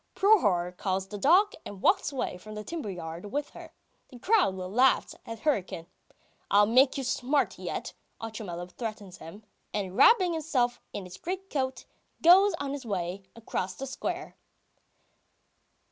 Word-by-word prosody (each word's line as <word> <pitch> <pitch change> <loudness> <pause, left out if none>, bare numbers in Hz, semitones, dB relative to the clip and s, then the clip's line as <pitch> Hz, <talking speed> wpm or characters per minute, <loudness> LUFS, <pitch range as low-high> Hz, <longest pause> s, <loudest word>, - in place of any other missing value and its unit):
Prohor 200 - +3
calls 190 0 -2
the 210 - -6
dog, 385 - +5
and 200 - -9
walks - - +3
away 265 -8 -3
from 215 +4 -10
the 210 - -5
timber 320 -4 -5
yard 175 +1 -7
with 290 +1 -3
her. - - -11 0.4
The 255 - -12
crowd 370 - +2
laughs 205 +8 +2
at 225 -1 -7
Hryukin. 195 - -1 0.6
"I'll 205 +1 +6
make 255 +6 +4
you 270 - -2
smart 265 +3 0
yet!" - - -5 0.3
Otchumyelov 190 -6 -6
threatens 215 -5 -6
him, 200 +7 -11 0.3
and 195 -3 -3
wrapping 375 - +6
himself 275 -7 0
in 200 - -5
his 180 - -10
greatcoat, 340 -8 -3 0.4
goes 385 +4 +7
on 280 -1 -4
his 285 -1 -5
way 190 -3 -3
across 205 -4 -4
the 270 - -5
square. 270 - -5
225 Hz, 145 wpm, -28 LUFS, 190-285 Hz, 0.6 s, goes